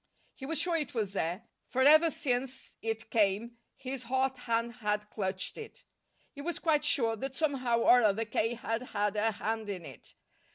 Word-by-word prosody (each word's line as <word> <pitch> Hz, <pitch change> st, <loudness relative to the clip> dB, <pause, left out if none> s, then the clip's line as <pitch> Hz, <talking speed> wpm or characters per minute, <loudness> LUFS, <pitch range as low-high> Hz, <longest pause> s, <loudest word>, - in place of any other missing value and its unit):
He 265 Hz, -, -8 dB
was 325 Hz, +1 st, -1 dB
sure 350 Hz, -2 st, +1 dB
it 295 Hz, -5 st, -4 dB
was 210 Hz, -4 st, -1 dB
there, 180 Hz, +2 st, -2 dB, 0.2 s
for 260 Hz, +1 st, +1 dB
ever 310 Hz, +4 st, +7 dB
since 265 Hz, -3 st, -2 dB
it 225 Hz, 0 st, -4 dB
came 220 Hz, +2 st, +1 dB, 0.2 s
his 265 Hz, -1 st, -6 dB
hot 260 Hz, +2 st, 0 dB
hand 235 Hz, -2 st, -2 dB
had 210 Hz, 0 st, -1 dB
clutched 190 Hz, -, -3 dB
it. 455 Hz, +3 st, -10 dB, 0.5 s
He 285 Hz, -, -8 dB
was 340 Hz, +3 st, -3 dB
quite 305 Hz, -3 st, +2 dB
sure 230 Hz, -6 st, +2 dB
that 270 Hz, +4 st, -5 dB
somehow 255 Hz, -7 st, +1 dB
or 245 Hz, +1 st, +6 dB
other 215 Hz, 0 st, +2 dB
K. 225 Hz, +2 st, 0 dB
had 225 Hz, 0 st, -2 dB, 0.2 s
had 205 Hz, 0 st, +1 dB
a 220 Hz, +1 st, +1 dB
hand 220 Hz, +1 st, -3 dB
in 185 Hz, -4 st, -5 dB
it. -, -, -12 dB
235 Hz, 180 wpm, -31 LUFS, 215-270 Hz, 0.5 s, ever